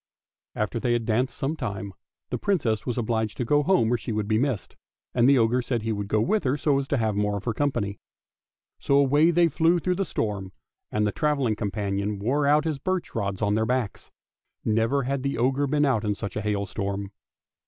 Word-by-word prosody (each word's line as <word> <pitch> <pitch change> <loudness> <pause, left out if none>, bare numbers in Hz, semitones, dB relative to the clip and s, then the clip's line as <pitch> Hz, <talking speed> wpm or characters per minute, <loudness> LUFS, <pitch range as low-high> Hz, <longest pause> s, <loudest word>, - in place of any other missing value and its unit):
After 105 +2 -1
they 120 0 +1
had 120 -1 0
danced 120 +4 0
some 140 +4 -1
time 100 -7 -5 0.4
the - - -2
Princess 135 - 0
was 125 - -2
obliged 110 -2 -1
to 125 - -1
go 145 +5 +3
home 145 -9 +3
or - - +2
she 115 - -5
would 105 -1 -1
be 110 0 +2
missed, 130 -5 -2 0.4
and 120 +1 +4
the 140 - +6
ogre 120 +2 +3
said 120 -2 -2
he 115 - -1
would 100 -1 -4
go 110 - +1
with 210 - +1
her 130 +2 +1
so 145 -2 +2
as 135 - -4
to 140 - 0
have 110 -3 0
more 105 0 0
of 100 - -7
her 115 - -1
company. 105 -7 -1 0.8
So 140 - +1
away 145 +4 +4
they 170 0 +4
flew 165 +3 +3
through 180 +2 0
the 195 - +1
storm, 100 - -3 0.4
and 105 0 +1
the 105 - +1
travelling 140 -6 +1
companion 100 0 -2
wore 135 +8 +1
out 150 +1 +4
his 155 -4 -1
birch 185 +4 -2
rods 100 -2 -2
on 105 0 +2
their 110 +1 +1
backs; 125 -4 -2 0.6
never 115 +5 +2
had 135 +1 -1
the 140 +1 -2
ogre 135 +4 +1
been 145 +1 +2
out 125 -7 +1
in 105 -1 0
such 100 0 -6
a 110 - -1
hailstorm. 100 -1 -2
120 Hz, 215 wpm, -26 LUFS, 105-140 Hz, 0.8 s, the